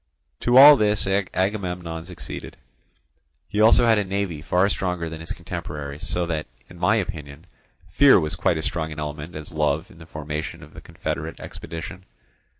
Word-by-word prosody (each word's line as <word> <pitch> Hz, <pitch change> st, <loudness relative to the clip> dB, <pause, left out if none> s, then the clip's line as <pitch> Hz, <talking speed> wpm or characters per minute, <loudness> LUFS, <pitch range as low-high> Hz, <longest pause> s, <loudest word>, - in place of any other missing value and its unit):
To 120 Hz, +1 st, +3 dB
all 145 Hz, +2 st, +11 dB
this 105 Hz, -2 st, +2 dB
Agamemnon 90 Hz, -3 st, -2 dB
succeeded. 90 Hz, -1 st, -8 dB, 0.9 s
He 105 Hz, -, -3 dB
had 110 Hz, -, +7 dB
also 115 Hz, +2 st, +6 dB
a 110 Hz, -3 st, +4 dB
navy 95 Hz, -5 st, -3 dB
far 90 Hz, +4 st, +2 dB
stronger 90 Hz, -4 st, -2 dB
than 80 Hz, 0 st, -7 dB
his 80 Hz, -1 st, -9 dB
contemporaries, 75 Hz, +3 st, -6 dB
so 90 Hz, 0 st, 0 dB
that, 80 Hz, -2 st, -3 dB, 0.2 s
in -, -, -14 dB
my -, -, +3 dB
opinion, 75 Hz, +1 st, -5 dB, 0.4 s
fear 135 Hz, +6 st, +6 dB
was 75 Hz, -2 st, -3 dB
quite 85 Hz, 0 st, +1 dB
as 80 Hz, -, -3 dB
strong 80 Hz, -2 st, -2 dB
an 75 Hz, -, -8 dB
element 75 Hz, +2 st, -6 dB
as 75 Hz, +1 st, -7 dB
love 75 Hz, +2 st, 0 dB
in 85 Hz, -, -17 dB
the 80 Hz, -, -13 dB
formation 75 Hz, 0 st, -5 dB
of -, -, -15 dB
the -, -, -11 dB
confederate -, -, -5 dB
expedition. 85 Hz, +3 st, -8 dB
85 Hz, 170 wpm, -23 LUFS, 80-95 Hz, 0.9 s, all